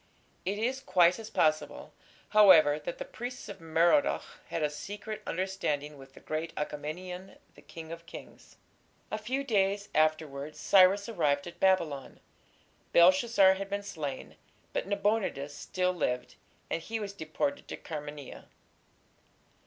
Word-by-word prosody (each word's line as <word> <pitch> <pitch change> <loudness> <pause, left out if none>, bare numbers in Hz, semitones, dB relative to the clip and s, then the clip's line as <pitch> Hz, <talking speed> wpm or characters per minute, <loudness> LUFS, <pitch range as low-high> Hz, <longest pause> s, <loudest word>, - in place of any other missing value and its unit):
It 200 +2 -1
is 250 +5 -1
quite 185 -6 +3
as 220 -1 -8
possible, 155 -1 0 0.4
however, 160 -8 +7
that - - -6
the - - -5
priests 245 - -7
of - - -9
Merodach 165 - +2
had 165 - -2
a 150 - +2
secret 205 +6 -7
understanding 165 -5 -2
with 135 -1 -15
the - - -12
great 155 +1 -4
Achaemenian, 180 +6 -5 0.2
the - - -17
"King 160 -1 -10
of 170 0 -9
kings". - - -12 0.5
A 215 - -2
few 255 +6 -2
days 200 -4 +1
afterwards 155 -2 0
Cyrus 195 +1 +5
arrived 150 -10 +1
at 175 - -10
Babylon. 165 -8 +1 0.7
Belshazzar 190 +3 +6
had 195 +1 -5
been 200 0 -3
slain, 155 -9 -6 0.4
but - - -2
Nabonidus 200 -8 0
still 185 +4 -1
lived, 125 -8 -2 0.4
and 165 - -1
he 225 +6 -4
was 200 -2 -5
deported 200 - -3
to - - -6
Carmania. 145 -3 -8
185 Hz, 135 wpm, -30 LUFS, 155-205 Hz, 0.7 s, however